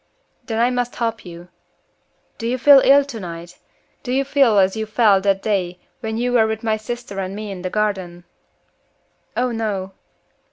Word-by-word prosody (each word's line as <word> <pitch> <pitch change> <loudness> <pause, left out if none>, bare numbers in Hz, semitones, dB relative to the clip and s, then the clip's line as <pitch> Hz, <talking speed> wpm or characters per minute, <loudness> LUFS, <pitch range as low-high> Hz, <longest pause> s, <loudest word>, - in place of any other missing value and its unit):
"Then 225 -3 -3
I 240 +2 +2
must 245 -1 -2
help 230 -1 -2
you. 175 0 -11 0.9
Do 230 - -3
you 250 +2 0
feel 275 +2 +7
ill 280 +1 +6
tonight? 175 -9 -8 0.4
Do 250 - -5
you 270 +2 +1
feel 270 -6 +3
as 190 0 +3
you 220 0 -3
felt 215 -3 +3
that 195 -1 +1
day 185 -4 -1 0.2
when 220 -2 -4
you 245 +1 -1
were 225 -2 +4
with 220 0 -4
my 220 -1 +1
sister 215 -2 -6
and 190 0 -4
me 210 -1 -6
in 185 -2 -7
the 185 - -3
garden?" 190 -4 -2 1.1
"Oh 250 0 +1
no." 205 -4 -3
220 Hz, 175 wpm, -20 LUFS, 195-240 Hz, 1.1 s, feel